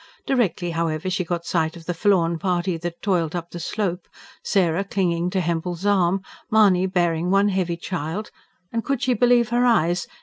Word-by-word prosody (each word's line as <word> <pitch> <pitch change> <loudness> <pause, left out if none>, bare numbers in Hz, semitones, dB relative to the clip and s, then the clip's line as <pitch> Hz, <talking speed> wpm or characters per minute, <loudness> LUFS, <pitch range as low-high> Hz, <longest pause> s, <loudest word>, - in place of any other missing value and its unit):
Directly, 185 -10 0
however, 165 +1 -2
she 185 0 0
got 170 0 -3
sight 160 0 -1
of 165 - -13
the 175 - -2
forlorn 170 -2 +2
party 180 0 0
that 170 +1 -6
toiled 175 -5 0
up 170 -1 -5
the 175 - -6
slope: 180 0 -3 0.4
Sarah 180 -2 +1
clinging 180 -3 0
to 185 0 0
Hempel's 170 +2 -2
arm, 190 -2 +2 0.3
Mahony 195 -4 +4
bearing 175 -2 0
one 195 +2 +4
heavy 180 -3 -1
child, 175 +4 -4 0.4
and 230 -1 -1
could 275 -3 -1
she 255 - +2
believe 240 0 +3
her 240 +1 +2
eyes? 175 -8 +2
180 Hz, 175 wpm, -23 LUFS, 170-200 Hz, 0.4 s, Mahony